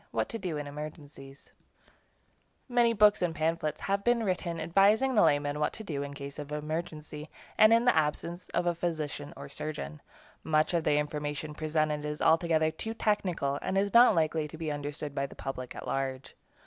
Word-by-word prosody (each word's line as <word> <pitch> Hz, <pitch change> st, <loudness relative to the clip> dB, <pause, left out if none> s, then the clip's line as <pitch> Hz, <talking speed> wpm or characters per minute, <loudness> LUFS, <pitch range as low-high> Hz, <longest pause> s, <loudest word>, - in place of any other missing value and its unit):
WHAT -, -, -1 dB
TO 230 Hz, -, -5 dB
DO 180 Hz, -6 st, -3 dB
IN 145 Hz, -, -4 dB
EMERGENCIES 145 Hz, -2 st, -9 dB, 1.2 s
Many 240 Hz, -2 st, +3 dB
books 210 Hz, -2 st, +5 dB
and 170 Hz, -2 st, 0 dB
pamphlets 155 Hz, -1 st, -1 dB
have 200 Hz, 0 st, -1 dB
been 240 Hz, 0 st, +2 dB
written 180 Hz, -4 st, -2 dB
advising 205 Hz, +10 st, +3 dB
the 215 Hz, -, +5 dB
layman 145 Hz, 0 st, +2 dB
what 150 Hz, -, 0 dB
to 220 Hz, -, -7 dB
do 150 Hz, -8 st, -3 dB
in 140 Hz, -, -4 dB
a -, -, -11 dB
case 140 Hz, 0 st, -8 dB
of 145 Hz, 0 st, -7 dB
emergency, 150 Hz, 0 st, -5 dB, 0.3 s
and 215 Hz, +1 st, +6 dB
in 230 Hz, +1 st, +5 dB
the 245 Hz, -, +5 dB
absence 165 Hz, +3 st, -1 dB
of -, -, -1 dB
a 175 Hz, -, +2 dB
physician 155 Hz, -4 st, -3 dB
or 140 Hz, 0 st, -8 dB
surgeon. 155 Hz, +1 st, -6 dB, 0.4 s
Much 155 Hz, +2 st, +2 dB
of 170 Hz, -2 st, +1 dB
the 145 Hz, -, +3 dB
information 150 Hz, 0 st, -3 dB
presented 155 Hz, -1 st, -1 dB
is 150 Hz, 0 st, -4 dB
altogether 160 Hz, -1 st, +3 dB
too 220 Hz, +8 st, -5 dB
technical, 180 Hz, -11 st, 0 dB
and 190 Hz, +1 st, -1 dB
is 200 Hz, +1 st, +1 dB
not 235 Hz, -2 st, +7 dB
likely 160 Hz, -1 st, +1 dB
to 155 Hz, -, -10 dB
be 160 Hz, -1 st, -3 dB
understood 145 Hz, 0 st, -5 dB
by 140 Hz, 0 st, -1 dB
the -, -, -13 dB
public 130 Hz, -2 st, -6 dB
at -, -, -7 dB
large. 135 Hz, -1 st, -3 dB
155 Hz, 190 wpm, -30 LUFS, 145-180 Hz, 1.2 s, not